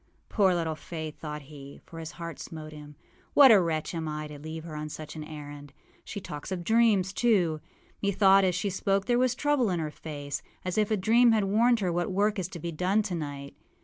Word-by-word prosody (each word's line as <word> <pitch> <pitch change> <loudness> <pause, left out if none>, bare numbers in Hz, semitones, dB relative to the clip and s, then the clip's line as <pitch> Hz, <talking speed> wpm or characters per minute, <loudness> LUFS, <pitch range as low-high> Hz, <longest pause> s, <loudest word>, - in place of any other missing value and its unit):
âPoor 190 -4 +3
little 165 -2 -1
Faith!â 155 0 -7
thought 150 -1 -6
he, 140 -1 -12
for 165 - -10
his 160 0 -7
heart 170 -2 -7
smote 155 -1 -8
him. 150 -1 -11 0.4
âWhat 275 -3 +10
a 205 -4 +7
wretch 160 -2 -2
am 165 -2 -3
I 155 0 -4
to 150 -1 -9
leave 160 +2 -7
her 160 -2 -8
on 150 0 -5
such 155 +1 -8
an 155 - -6
errand! 145 -2 -9 0.3
She 205 - -6
talks 150 -3 -8
of 180 -2 -3
dreams, 215 -3 +3
too. 180 -11 +2 0.4
Methought 195 -1 +5
as 185 -2 +2
she 195 +2 -1
spoke 195 +1 0
there 240 0 +2
was 250 -1 +2
trouble 290 -5 +1
in 175 -2 0
her 155 -2 -3
face, 145 -2 -6 0.2
as 185 +3 0
if 210 - +2
a 215 - +1
dream 230 +5 +5
had 215 -2 +2
warned 225 +4 +3
her 180 -3 0
what 175 +3 -1
work 205 +2 +1
is 180 - -2
to 185 -2 -9
be 170 +2 -4
done 185 +6 +1
tonight. 145 -7 -5
175 Hz, 220 wpm, -28 LUFS, 155-200 Hz, 0.4 s, âWhat